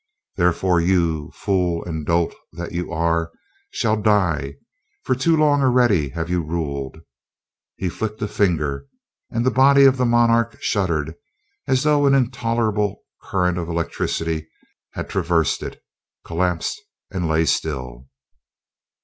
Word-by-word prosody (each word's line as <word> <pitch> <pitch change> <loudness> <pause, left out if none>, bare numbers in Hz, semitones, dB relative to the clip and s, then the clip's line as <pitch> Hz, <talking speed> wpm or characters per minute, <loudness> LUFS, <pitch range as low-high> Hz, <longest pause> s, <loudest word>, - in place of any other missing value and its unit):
Therefore 90 0 +2
you, 85 -4 +1
fool 90 -4 0
and 80 -3 -5
dolt 85 0 +1 0.2
that 85 +1 -6
you 90 0 -4
are, 85 0 0 0.4
shall 110 -1 0
die 85 -10 +1 0.5
for - - +1
too 160 +6 +2
long 145 -2 +3
already 120 - +3
have 80 +3 -4
you 90 0 0
ruled." 75 -4 -4 0.8
He 95 - -3
flicked 110 +5 -4
a - - 0
finger 75 -10 0 0.4
and 115 +1 -1
the 130 - +3
body 140 +1 +6
of 135 -1 +6
the 125 - +1
monarch 115 -1 +3
shuddered 80 -6 -1 0.5
as 130 0 +2
though 145 -1 +3
an 140 - +5
intolerable 115 -5 0 0.2
current 90 -2 0
of 85 -1 -4
electricity 80 -1 -2 0.4
had - - -5
traversed 85 -3 0
it, - - -8 0.4
collapsed 90 0 -1 0.3
and 90 -4 -2
lay 80 +1 +2
still. 65 -6 -2
90 Hz, 130 wpm, -21 LUFS, 80-115 Hz, 0.8 s, body